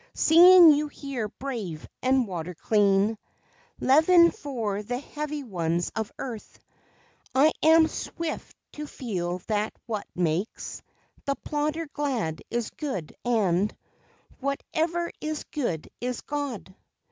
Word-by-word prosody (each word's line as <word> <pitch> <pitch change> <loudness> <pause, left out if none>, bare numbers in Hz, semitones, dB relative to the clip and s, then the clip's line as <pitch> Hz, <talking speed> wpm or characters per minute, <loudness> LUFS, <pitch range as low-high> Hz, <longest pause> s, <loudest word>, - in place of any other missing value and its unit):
Seeing 345 +1 +8
you 300 +1 +2
here 275 -6 -5
brave 215 - -6
and 255 -2 +2
water 180 -1 -5
clean, 205 +2 +2 0.6
Leaven 335 +5 +6
for 235 - -3
the 245 +4 -3
heavy 300 +2 -5
ones 175 -6 -1
of 220 -1 -3
earth, 235 -5 -7 0.8
I 290 +4 +6
am 320 +1 +6
swift 330 0 -5
to 300 0 -7
feel 180 -9 -4
that 215 0 -1
what 215 -4 -4
makes 175 +4 -2 0.4
The 275 -1 0
plodder 300 +3 -2
glad 260 - -2
is 235 -1 -2
good; 195 - -5
and 205 -5 +1 0.6
Whatever 320 +5 -1
is 310 0 -3
good 235 - -3
is 250 0 -3
God. 280 -10 -4
250 Hz, 115 wpm, -26 LUFS, 200-300 Hz, 0.8 s, Seeing